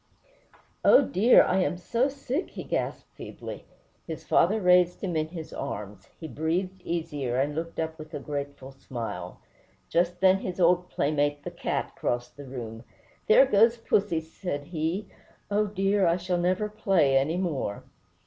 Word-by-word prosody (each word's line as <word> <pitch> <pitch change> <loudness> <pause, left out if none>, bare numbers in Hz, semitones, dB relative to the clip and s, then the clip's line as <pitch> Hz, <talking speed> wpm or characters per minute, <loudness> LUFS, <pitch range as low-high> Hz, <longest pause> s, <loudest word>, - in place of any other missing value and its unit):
"Oh, 280 - +7
dear! 225 +1 +5
I 185 - +1
am 180 -1 0
so 235 +9 0
sick!" 280 +4 -3
he - - -7
gasped - - -3
feebly. - - -8 0.4
His - - -6
father 210 +6 +3
raised 180 -2 +4
him 180 -4 -2
in 155 0 0
his 160 -1 -8
arms; 100 -1 -6
he 160 - -6
breathed 175 +7 -2
easier, 150 -8 -3
and 140 +3 +1
looked 165 +2 -5
up 160 0 -3
with 155 0 -10
a - - -3
grateful 140 -2 -6
smile. 125 -3 -6 0.5
Just 175 +1 +1
then 190 +1 +5
his 185 -1 -5
old 180 +1 +3
playmate, 145 0 0
the - - -5
cat, - - -3
crossed 120 0 -2
the 145 - -10
room. 115 -4 -7 0.4
"There 240 +5 +7
goes 230 0 +4
pussy," 200 -7 +1
said 160 -2 -5
he; 165 +5 -3 0.4
"oh, 210 +1 +2
dear! 195 -1 +1
I 170 +1 +3
shall 180 0 -1
never 185 +4 +1
play 195 -10 +2
any 145 +6 +2
more!" 150 - -2
170 Hz, 160 wpm, -27 LUFS, 145-190 Hz, 0.5 s, Oh